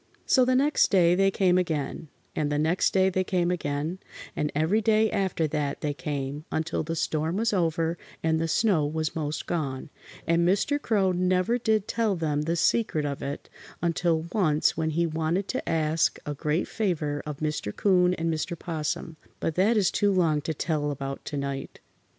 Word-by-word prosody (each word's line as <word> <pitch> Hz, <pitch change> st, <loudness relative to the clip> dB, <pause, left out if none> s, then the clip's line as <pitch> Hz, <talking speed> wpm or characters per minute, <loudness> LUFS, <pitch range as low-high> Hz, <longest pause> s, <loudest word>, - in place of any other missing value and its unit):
So 255 Hz, -2 st, +4 dB
the 255 Hz, 0 st, +2 dB
next 285 Hz, +3 st, +3 dB
day 175 Hz, -3 st, +4 dB
they 195 Hz, +2 st, +3 dB
came 185 Hz, -2 st, +3 dB
again, 155 Hz, -3 st, -2 dB, 0.3 s
and 150 Hz, -1 st, 0 dB
the 145 Hz, -, +1 dB
next 160 Hz, +5 st, +2 dB
day 190 Hz, 0 st, +3 dB
they 185 Hz, +1 st, +1 dB
came 180 Hz, -2 st, 0 dB
again, 155 Hz, +1 st, -2 dB, 0.4 s
and 150 Hz, -, -1 dB
every 160 Hz, +9 st, +2 dB
day 220 Hz, 0 st, +3 dB
after 190 Hz, -4 st, 0 dB
that 145 Hz, -2 st, -2 dB
they 150 Hz, -1 st, -1 dB
came, 145 Hz, 0 st, -4 dB
until 160 Hz, +1 st, -1 dB
the 165 Hz, +1 st, -3 dB
storm 160 Hz, +1 st, -1 dB
was 225 Hz, 0 st, +1 dB
over 165 Hz, -2 st, 0 dB, 0.2 s
and 160 Hz, 0 st, +2 dB
the 165 Hz, -, 0 dB
snow 185 Hz, -2 st, +2 dB
was 155 Hz, +2 st, -2 dB
'most 155 Hz, -1 st, -3 dB
gone, 140 Hz, -4 st, -3 dB, 0.3 s
and 170 Hz, 0 st, +2 dB
Mr. 205 Hz, +11 st, +1 dB
Crow 200 Hz, -7 st, +2 dB
never 185 Hz, +6 st, +1 dB
did 220 Hz, -3 st, +1 dB
tell 225 Hz, -4 st, 0 dB
them 150 Hz, -3 st, -1 dB
the 165 Hz, +3 st, -1 dB
secret 170 Hz, -3 st, +1 dB
of 140 Hz, -1 st, -3 dB
it 140 Hz, +1 st, -5 dB, 0.3 s
until 170 Hz, -1 st, +1 dB
once 155 Hz, -8 st, +2 dB
when 160 Hz, -, -1 dB
he 170 Hz, +2 st, +1 dB
wanted 165 Hz, +4 st, -1 dB
to 255 Hz, -, -3 dB
ask 160 Hz, -1 st, +1 dB
a 150 Hz, -, -3 dB
great 150 Hz, +3 st, -1 dB
favor 155 Hz, -9 st, -1 dB
of 150 Hz, -2 st, -4 dB
Mr. 150 Hz, -9 st, -2 dB
'Coon 180 Hz, -, +3 dB
and 165 Hz, -1 st, -1 dB
Mr. 170 Hz, +2 st, -3 dB
'Possum, 160 Hz, 0 st, -4 dB, 0.2 s
but 165 Hz, -, -1 dB
that 205 Hz, +7 st, +3 dB
is 200 Hz, -3 st, +3 dB
too 205 Hz, 0 st, +2 dB
long 165 Hz, -6 st, +2 dB
to 160 Hz, -, -3 dB
tell 150 Hz, -1 st, -1 dB
about 135 Hz, -1 st, -5 dB
to 145 Hz, -, -4 dB
night. 140 Hz, -1 st, -4 dB
165 Hz, 185 wpm, -26 LUFS, 150-185 Hz, 0.4 s, So